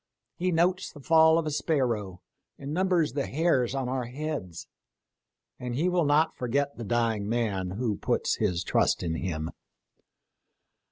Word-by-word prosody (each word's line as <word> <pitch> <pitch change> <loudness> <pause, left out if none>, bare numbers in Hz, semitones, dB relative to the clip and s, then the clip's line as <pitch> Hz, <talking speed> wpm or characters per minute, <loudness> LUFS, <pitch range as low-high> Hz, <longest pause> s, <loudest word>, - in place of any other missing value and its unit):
He 180 +1 0
notes 180 +3 +1
the 145 - -13
fall 160 +3 +5
of 165 - 0
a 155 - -2
sparrow, 120 - -1 0.3
and 140 +1 -6
numbers 180 -6 +1
the 140 -1 -1
hairs 135 -5 +1
of 135 -2 -1
our 130 -1 -2
heads; 125 - -5 0.9
and 125 -1 -4
He 165 +7 +1
will 175 -3 +2
not 150 +3 +3
forget 140 +3 -1
the 115 - -7
dying 110 -2 0
man 105 -6 -1
who 110 -4 -1
puts - - 0
his 90 -5 0
trust - - +1
in 85 -2 -1
him. 80 -2 -3
130 Hz, 155 wpm, -28 LUFS, 110-160 Hz, 0.9 s, fall